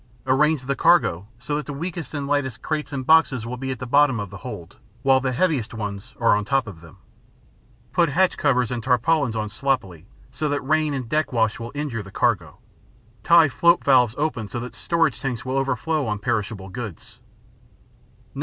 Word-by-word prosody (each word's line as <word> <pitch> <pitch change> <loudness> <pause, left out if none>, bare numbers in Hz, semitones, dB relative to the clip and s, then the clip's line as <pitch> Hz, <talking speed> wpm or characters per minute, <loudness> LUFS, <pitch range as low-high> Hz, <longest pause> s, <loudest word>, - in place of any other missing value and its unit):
Arrange 140 +1 +2
the 140 +1 -1
cargo 135 - +3
so 125 +5 -4
that 150 - -3
the 145 - -5
weakest 160 -1 -5
and 145 -1 -3
lightest 140 -4 -1
crates 155 -1 -3
and 135 -2 -4
boxes 145 -6 +4
will 120 +2 -4
be 130 +1 -5
at 130 - -3
the 130 - -6
bottom 140 -1 +3
of 100 -2 -5
the - - -8
hold, 85 +2 -9 0.3
while 135 -1 +5
the 130 0 -1
heaviest 130 -6 0
ones 100 -2 -6
are 115 -3 +4
on 105 - -1
top 135 +4 +1
of 95 -7 -10
them. 80 -2 -15 1.0
Put 170 -2 +3
hatch 185 +6 +2
covers 125 -5 +1
and 120 -1 -2
tarpaulins 125 +1 +1
on 110 -1 -2
sloppily, 100 - -2 0.2
so 150 0 -2
that 145 0 -1
rain 155 +1 +1
and 130 -3 -4
deck 155 +5 0
wash 110 -3 +1
will 115 +1 -6
injure 145 -7 -3
the 95 - -11
cargo. 95 - 0 0.7
Tie 170 -2 +6
float 170 +6 +3
valves 125 -4 +4
open 145 -8 -2
so 120 - -5
that 120 -1 -7
storage 110 +11 0
tanks 130 -4 -4
will 130 +1 -2
overflow 135 +2 -1
on 105 -1 -1
perishable 100 -2 -3
goods. 110 -5 -8
130 Hz, 190 wpm, -23 LUFS, 110-145 Hz, 1.0 s, Tie